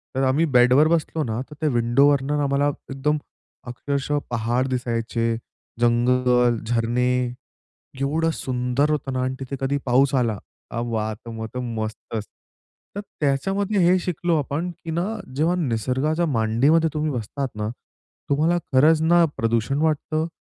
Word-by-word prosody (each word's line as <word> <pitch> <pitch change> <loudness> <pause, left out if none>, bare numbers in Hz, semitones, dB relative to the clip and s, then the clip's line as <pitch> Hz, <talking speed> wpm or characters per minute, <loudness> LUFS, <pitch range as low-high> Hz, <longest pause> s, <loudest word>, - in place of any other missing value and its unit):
तर 135 - +1
आम्ही 135 +5 +3
बेडवर 125 +5 +6
बसलो 160 -1 0
ना, 115 -1 -2
तर 150 - -11
त्या 155 - +1
विंडोवरनं 135 +4 +2
आम्हाला 140 +1 +1 0.2
एकदम 145 +3 0 0.5
अक्षरशः 140 +4 -2
पहाड 120 +2 0
दिसायचे, 115 -2 -1 0.4
जंगल, 125 0 +3
झरणे 120 +2 +1 0.9
एवढं 155 +4 +1
सुंदर 125 +3 -1
होतं 140 -3 -2
ना 130 - -1
आणि 130 +1 -2
तिथे 135 +1 -5
कधी 140 +1 0
पाऊस 135 +2 +3
आला, 115 -5 +1 0.3
अ, 120 - -3
वाह! 110 -2 -2
तर 115 +2 -12
मग 110 -1 -5
तर 125 - -3
मस्तच. 110 -2 -4 0.7
तर 205 - -3 0.2
त्याच्यामध्ये 195 +9 0
हे 180 +2 +5
शिकलो 175 -1 -1
आपण, 150 +5 -2
की 170 -1 -8
ना, 170 +3 0 0.3
जेव्हा 165 +5 +2
निसर्गाच्या 140 +3 0
मांडीमध्ये 140 +5 +2
तुम्ही 155 0 -1
बसतात 130 +3 -3
ना, 105 0 -2 0.6
तुम्हाला 155 +5 +2 0.2
खरंच 155 +4 +5
ना 170 +2 +5
प्रदूषण 115 +4 0
वाटतं, 155 +1 0
135 Hz, 140 wpm, -23 LUFS, 120-155 Hz, 0.9 s, बेडवर